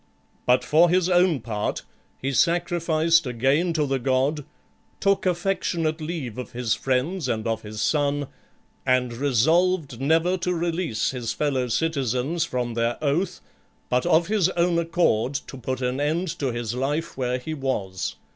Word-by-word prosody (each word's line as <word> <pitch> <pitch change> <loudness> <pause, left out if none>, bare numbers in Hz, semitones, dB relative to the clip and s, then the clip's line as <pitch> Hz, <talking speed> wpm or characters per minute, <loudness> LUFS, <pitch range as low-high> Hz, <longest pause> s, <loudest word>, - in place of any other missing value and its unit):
But 125 +1 +4
for 165 +3 +4
his 180 +1 +2
own 175 -6 +3
part, 105 -2 -3 0.3
he 135 +1 -3
sacrificed 170 0 +2
again 135 +8 +1
to 155 -2 +1
the 135 -1 -1
god, 135 +3 0 0.5
took 195 -1 +2
affectionate 170 -3 -1
leave 150 -8 -4
of 125 - -7
his 120 -2 0
friends 135 +5 -1
and 110 -3 -2
of 115 -1 -1
his 105 0 -5
son, 145 -1 +1 0.6
and 130 -2 +1
resolved 145 +3 +1
never 165 +6 +2
to 180 0 -1
release 170 -7 -1
his 125 -3 -3
fellow 135 -4 0
citizens 140 +3 0
from 125 -5 -2
their 115 +1 0
oath, 155 +6 -1 0.5
but 125 0 +1
of 165 +2 +4
his 200 -3 +2
own 170 0 +3
accord 160 -7 +1
to 135 - -5
put 130 0 -4
an 125 +2 -1
end 160 +5 0
to 140 - 0
his 120 -1 -3
life 145 +6 -2
where 125 -1 -1
he 145 +5 -5
was. 105 - -3
145 Hz, 155 wpm, -24 LUFS, 125-170 Hz, 0.6 s, But